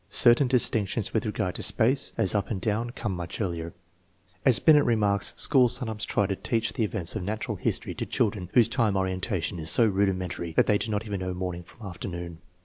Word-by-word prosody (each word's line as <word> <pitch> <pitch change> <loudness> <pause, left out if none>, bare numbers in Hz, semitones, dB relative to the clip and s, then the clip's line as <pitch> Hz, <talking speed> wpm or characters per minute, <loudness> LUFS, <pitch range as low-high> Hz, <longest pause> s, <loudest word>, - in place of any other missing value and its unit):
Certain 120 +3 +4
distinctions 115 -4 0
with 110 0 0
regard 95 -3 -2
to - - -6
space, 130 +4 +1
as 95 - +2
up 100 -2 -1
and 105 - -3
down, 110 +4 -1
come 110 -5 -4
much 85 -1 -6
earlier. 85 -5 -3 0.7
As 130 -4 +5
Binet 150 -2 +5
remarks, 105 -4 +1
schools 125 -4 +5
sometimes 110 -4 -3
try 100 - 0
to 100 0 -2
teach 115 +3 -2
the 120 - -1
events 100 -4 -1
of 110 - -3
national 105 +3 -4
history - - -2
to - - -4
children 100 -4 -1
whose 120 -3 +6
time 115 -5 +1
orientation 95 -1 -2
is 80 - -2
so 115 - +4
rudimentary 95 -4 -1
that - - +3
they 105 -1 +2
do 115 - -3
not 105 +1 -2
even 100 -2 -4
know 90 0 -4
morning 90 -1 -4
from 105 +6 -14
afternoon 85 -2 -7
105 Hz, 205 wpm, -26 LUFS, 95-115 Hz, 0.7 s, whose